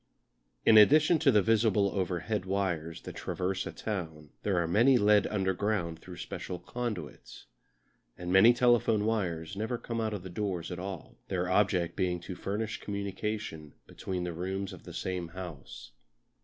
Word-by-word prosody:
In 110 - +8
addition 155 +8 +6
to 155 - +4
the 105 -4 +4
visible 105 -3 +3
overhead 95 +2 -2
wires 90 -4 -2
that - - -8
traverse 95 +1 -2
a - - -4
town 80 -8 -5
there 100 -3 0
are 85 -1 +1
many 120 +9 +5
led 105 -2 +4
underground 95 -3 -1
through 90 -1 -11
special 90 - -5
conduits. 105 - -6 0.7
And 90 0 -3
many 95 +5 +8
telephone 120 -3 +3
wires 90 -6 -1
never 110 +4 -2
come 115 -1 -4
out 110 -1 -1
of 95 -2 -8
doors 95 -4 -3
at 90 - -5
all, 95 -3 -7
their 90 -2 -1
object 90 -2 +2
being 90 -2 0
to 90 - -6
furnish 105 +4 -3
communication 100 -5 -4
between 90 -2 -5
the 90 -1 -3
rooms 95 +3 -3
of 90 - -12
the 85 - -9
same 90 -3 -3
house. 80 -10 -9
95 Hz, 155 wpm, -30 LUFS, 90-105 Hz, 0.7 s, In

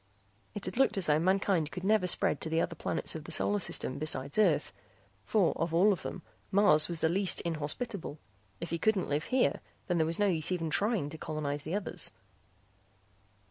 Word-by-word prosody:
It 205 - -4
had - - -5
looked 270 -5 +3
as 190 - +2
though 150 0 +3
mankind 185 -2 +1
could 180 +2 -7
never 210 -2 +2
spread - - +3
to 160 - -3
the 160 +1 +1
other 170 - -1
planets 160 - -2
of 155 -2 -7
the - - -8
solar 205 0 +3
system 140 -7 -2
besides 145 +2 -2
Earth 160 - +2 0.5
for 200 -6 +2
of 165 0 -2
all 200 +5 +5
of 185 - -6
them 185 - -7 0.3
Mars 155 -6 +5
was 170 -2 -5
the - - +3
least 190 +3 +2
inhospitable; 165 +3 -4 0.4
if - - -6
he 170 - -2
couldn't 215 -2 +1
live 145 +1 -1
here 255 0 +1 0.3
there 175 -3 +1
was 165 +1 -1
no 205 - +2
use 170 -4 0
even 165 -3 -2
trying 205 -7 0
to 160 +1 -9
colonize 150 -2 -3
the 160 +5 -4
others. 205 - -3
170 Hz, 195 wpm, -30 LUFS, 155-200 Hz, 0.5 s, all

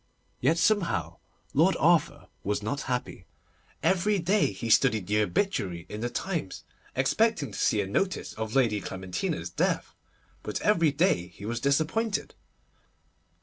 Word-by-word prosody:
Yet 165 - +2
somehow 170 - +1 0.4
Lord - - +4
Arthur - - +2 0.2
was 105 +1 -1
not 140 +8 -2
happy. 125 -1 -3 0.6
Every 195 +3 +2
day 190 - +2
he 100 +4 -6
studied 110 -3 +3
the 105 +3 +2
obituary 95 - -1
column - - -13
in 105 - -6
the 120 - -1
Times, 165 - -4 0.3
expecting 155 - +1
to - - -7
see 105 - +2
a - - -2
notice 185 - -1
of 110 +1 -5
Lady 115 -6 +2
Clementina's 95 -1 -4
death, - - -1 0.5
but 105 - -4
every 170 -7 +3
day 140 - +1
he 95 +3 -12
was 115 +2 -2
disappointed. 160 - 0
125 Hz, 145 wpm, -28 LUFS, -, 0.6 s, Lord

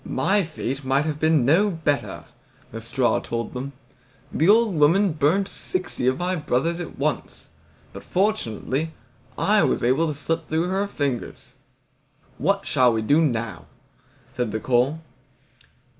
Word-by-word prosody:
"My 205 +1 +1
fate 145 -5 -4
might 135 +3 +1
have 155 -1 -3
been 155 -5 +3
no 175 +10 +4
better," 160 -5 -2 0.5
the 115 - -7
straw 120 +2 +1
told 115 0 -4
them. 135 +2 -5 0.6
"The 160 +5 +2
old 220 -1 +5
woman 170 +6 +4
burnt 165 +7 +2
sixty 185 -9 -3
of 130 0 +2
my 180 +1 -1
brothers 160 +2 -1
at 175 - -7
once, - - -3 0.4
but - - -9
fortunately 160 - -1 0.4
I - - +3
was - - +1
able 135 +7 +2
to 150 - -3
slip 165 +3 -3
through 165 +3 0
her 195 +2 0
fingers." 140 -10 -4 0.9
"What 195 +7 +1
shall 130 -3 +3
we 110 -1 -1
do 145 +8 +3
now?" 115 - -2 0.7
said 125 -4 -2
the 110 - -2
coal. 130 +7 +1
150 Hz, 145 wpm, -23 LUFS, 130-175 Hz, 0.9 s, old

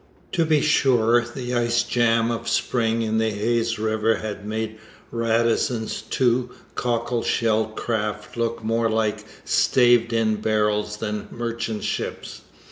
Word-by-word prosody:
To 165 -2 +1
be 155 -2 +3
sure, 120 -5 +3
the 120 +1 -6
ice 120 0 +2
jam 115 -1 +2
of 115 - -3
spring 115 -2 +1
in 110 0 0
the 110 0 +2
Hayes 115 +2 0
river 110 +1 +1
had 105 -1 -6
made 110 0 -3 0.3
Radisson's 115 0 0
two 125 -1 +1 0.2
cockle 120 0 -1
shell 110 -2 +1
craft 110 -1 -3
look 115 -1 -2
more 115 +1 +1
like 110 -1 0 0.2
staved 120 -2 +4
in 110 -2 +1
barrels 105 -1 0
than 105 -1 -4
merchant 115 -2 -4
ships. - - -4
115 Hz, 130 wpm, -23 LUFS, 110-120 Hz, 0.3 s, staved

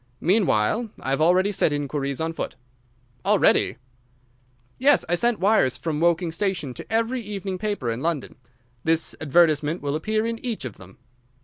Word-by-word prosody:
Meanwhile 190 - +2
I 135 - -4
have 135 - 0
already 185 +5 +4
set 175 - +2
inquiries 140 -1 -2
on 165 0 -2
foot." - - -5 0.7
"Already?" - - +3 1.0
"Yes, 280 +3 +4
I - - -1
sent 235 +5 +1
wires 185 - +3
from 155 -3 -3
Woking 170 0 +2
station 165 -6 -2
to - - -10
every 230 +3 0
evening 200 -3 -5
paper 200 - -2
in 115 +2 -4
London. 160 -4 -2 0.5
This 165 0 +1
advertisement 155 0 +2
will 145 0 -1
appear 215 +7 -1
in 230 0 -4
each 230 - -3
of 120 - -7
them." 95 +1 -15
170 Hz, 155 wpm, -24 LUFS, 145-210 Hz, 1.0 s, already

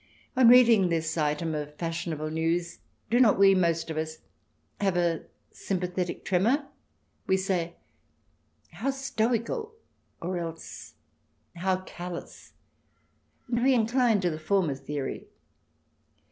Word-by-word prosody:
On 255 -2 +6
reading 230 -6 +7
this 160 -1 -1
item 155 +1 0
of 150 -1 -5
fashionable 165 -2 -3
news 165 +2 -1 0.3
do 240 - +4
not 235 -5 +5
we, 195 0 +7
most 170 -3 +1
of 160 - -5
us, 155 0 -3 0.6
have 195 -3 +1
a 170 -2 0 0.3
sympathetic 180 -1 -3
tremor? 230 +11 +2 0.6
We 190 - +3
say, 180 -3 -1 0.5
" - - -40
How 270 - +1
stoical 270 - -1 0.2
!" - - -44
or 180 +1 -2
else, 165 -1 -8 0.3
" - - -44
How 185 -1 +1
callous 175 -1 -8 0.9
I" 240 -1 -1
and 240 - 0
we 265 0 +5
incline 230 -2 +2
to 175 -2 +1
the 155 - -5
former 175 -2 +1
theory. 140 0 -5
180 Hz, 130 wpm, -28 LUFS, 165-225 Hz, 0.9 s, reading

